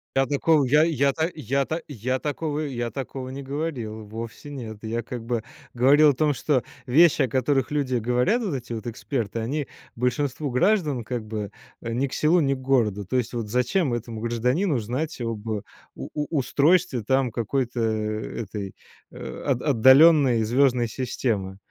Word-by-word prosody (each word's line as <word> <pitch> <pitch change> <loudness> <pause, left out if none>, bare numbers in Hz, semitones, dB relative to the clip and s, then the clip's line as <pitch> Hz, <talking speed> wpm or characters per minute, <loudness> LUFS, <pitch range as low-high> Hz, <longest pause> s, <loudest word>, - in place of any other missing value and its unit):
Я 135 0 +3
такого, 145 +2 +3
я 150 +4 +5
я, 140 -4 +2
та 160 +5 -1
я, 140 -1 -1
та 160 +1 -3
я 130 -1 -2
такого 150 +1 -3
я 120 -6 -3
такого 130 -1 -6
не 140 - -6
говорил. 135 -6 -4
Вовсе 115 +6 -8
нет. 115 -6 -7
Я, 115 +2 -2
как 120 0 -7
бы, 115 -2 -2 0.3
говорил 140 +5 +6
о 145 - +3
том, 150 +1 +1
что 130 -2 +1 0.2
вещи, 150 +3 +5
о - - +1
которых 135 +3 0
люди 140 -4 0
говорят, 125 - +1
вот 190 - -2
эти 120 -3 -5
вот 115 0 -6
эксперты, 115 -2 -3
они 135 +6 -2 0.3
большинству 130 +4 -1
граждан, 150 - +2
как 120 -1 -4
бы, 105 -2 -4 0.3
э, 115 - -4
ни 130 +4 +1
к 135 - -7
селу 165 +3 +3
ни 140 -2 +2
к 130 - -5
городу. 115 -7 +1
То 130 - 0
есть, 120 -1 -2
вот 115 -3 -3
зачем 125 - +1
этому 115 -1 -5
гражданину 125 - 0
знать 130 +9 -3
об 115 -2 -4
у 110 -2 -2 0.3
у 150 - -5
устройстве 140 0 +2
там 130 +2 +1
какой-то, 120 +2 -2
а, 110 -1 -2
этой, 100 -2 -6 0.4
а, - - -8
от 130 -3 +1
отдаленной 135 -1 +6
звездной 125 +1 +2
системы? 110 -5 -2
130 Hz, 175 wpm, -24 LUFS, 115-145 Hz, 0.4 s, говорил